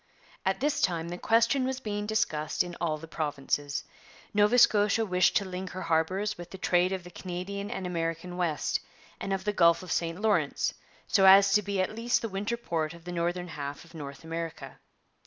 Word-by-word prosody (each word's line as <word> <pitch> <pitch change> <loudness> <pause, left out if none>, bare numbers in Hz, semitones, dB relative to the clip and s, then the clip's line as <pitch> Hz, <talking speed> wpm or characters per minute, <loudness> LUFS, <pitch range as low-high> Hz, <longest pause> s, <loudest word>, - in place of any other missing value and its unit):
At 190 - 0
this 290 +1 +1
time 170 -2 0
the 175 - -5
question 230 +4 +3
was 260 0 -2
being 210 -4 -3
discussed 155 -10 0
in 175 -1 -7
all 160 -3 0
the 165 +2 -10
provinces. 145 -2 -2 0.5
Nova 210 +3 +4
Scotia 215 -1 +5
wished 180 -2 +3
to 200 - -1
link 185 0 -5
her 185 +1 -6
harbours 185 +5 0
with 175 - -8
the 190 - -8
trade 180 0 +2
of 190 -2 -3
the 180 - -11
Canadian 190 +3 -5
and 190 - -4
American 165 0 -3
West 170 -4 0 0.4
and 195 - -4
of 190 -1 -1
the 210 +1 0
Gulf 170 -2 +4
of 185 - -7
St 165 +1 -1
Lawrence, 215 0 +1 0.3
so 195 -2 +4
as 195 +1 +8
to 210 - +5
be 200 -1 -2
at 185 +3 0
least 235 +2 0
the 230 - -2
winter 205 +4 -2
port 165 -7 -2
of 170 - -15
the 175 - -6
northern 175 +1 -2
half 145 -1 -6
of 170 - -18
North 140 -3 -8
America. 165 0 -6
180 Hz, 200 wpm, -29 LUFS, 165-205 Hz, 0.5 s, as